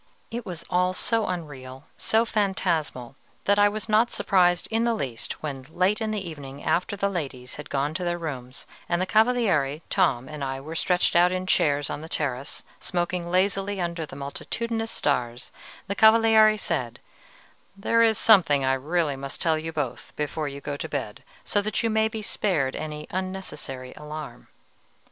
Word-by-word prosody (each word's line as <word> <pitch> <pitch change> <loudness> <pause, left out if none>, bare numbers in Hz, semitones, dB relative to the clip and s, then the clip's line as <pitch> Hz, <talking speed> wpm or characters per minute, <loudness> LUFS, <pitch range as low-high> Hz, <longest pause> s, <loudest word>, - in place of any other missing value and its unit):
It 235 0 -5
was 170 -2 -6
all 180 +1 +1
so 225 +2 +1
unreal, 135 -7 -6
so 225 +1 +2
phantasmal, 165 - -1 0.3
that 205 0 +4
I 205 0 +6
was 215 +1 -5
not 220 +2 +4
surprised 180 -5 +3
in 225 +1 +2
the 235 -1 +2
least 130 - -5
when, 135 -3 -5
late 185 +6 +1
in 220 - 0
the 205 -4 -2
evening 140 -3 -8
after 185 +3 +1
the 200 0 0
ladies 135 -9 -5
had 150 - -8
gone 145 +2 0
to 180 +2 -3
their 175 0 0
rooms, 130 -6 -6 0.2
and 175 - +1
the 185 - +1
Cavaliere, 205 - +2
Tom, 150 -10 +2
and 150 -2 -6
I 135 0 -2
were 155 +4 -7
stretched 180 +2 +1
out 175 +1 +6
in 185 0 -2
chairs 145 -5 +2
on - - -4
the 160 - -9
terrace, 135 -4 -3 0.2
smoking 175 -1 -2
lazily 195 +2 +1
under 170 -2 -2
the - - -10
multitudinous 225 +11 -3
stars, 120 - -1 0.3
the 200 - -2
Cavaliere 220 -1 +6
said, 125 - -2 0.8
"There 230 +3 +2
is 225 -1 +4
something 155 -11 +5
I 130 - +3
really 150 +2 0
must 135 0 -6
tell 160 -2 +2
you 165 +1 -4
both 145 -6 -4
before 150 +1 -2
you 140 0 -6
go 145 0 -4
to 160 - -5
bed, 135 -8 -4 0.2
so 205 - +1
that 215 +3 -1
you 230 - +1
may 220 0 +3
be 220 -1 -5
spared 160 -11 0
any 150 -1 -5
unnecessary 185 -9 -5
alarm." 150 -5 -8
170 Hz, 175 wpm, -26 LUFS, 140-205 Hz, 0.8 s, I